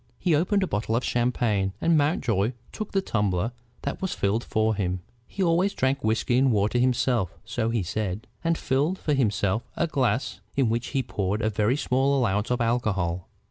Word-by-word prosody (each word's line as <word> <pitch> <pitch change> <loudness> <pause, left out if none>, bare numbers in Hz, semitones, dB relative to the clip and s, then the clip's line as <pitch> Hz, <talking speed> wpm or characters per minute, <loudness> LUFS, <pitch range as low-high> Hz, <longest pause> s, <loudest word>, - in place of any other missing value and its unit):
He 180 -3 +1
opened 185 +6 +2
a - - 0
bottle 110 -4 -1
of 120 - 0
champagne, 115 -5 +1
and 165 0 +3
Mountjoy 125 - +1 0.2
took 215 -1 -5
the 195 -1 +1
tumbler 105 - 0 0.3
that - - -3
was 190 - -2
filled 105 +4 0
for 110 -1 +1
him. 90 -3 -2 0.3
He 195 - -2
always 180 +3 +2
drank 135 +2 0
whiskey 110 +3 +2
and 135 -1 +4
water 105 +3 +2
himself, 125 -6 +1
so 115 0 -1
he 115 -4 0
said, 105 +3 -3 0.2
and 165 0 +1
filled 145 +8 0
for 150 - -1
himself 105 -5 +1 0.2
a - - +2
glass 135 -4 0 0.2
in 135 -4 +2
which 120 +2 -1
he 135 - -1
poured 105 -1 -2
a 110 - +1
very 110 +5 +1
small 135 0 +2
allowance 105 -4 +1
of 125 0 0
alcohol. 100 -7 0
120 Hz, 185 wpm, -26 LUFS, 105-135 Hz, 0.3 s, and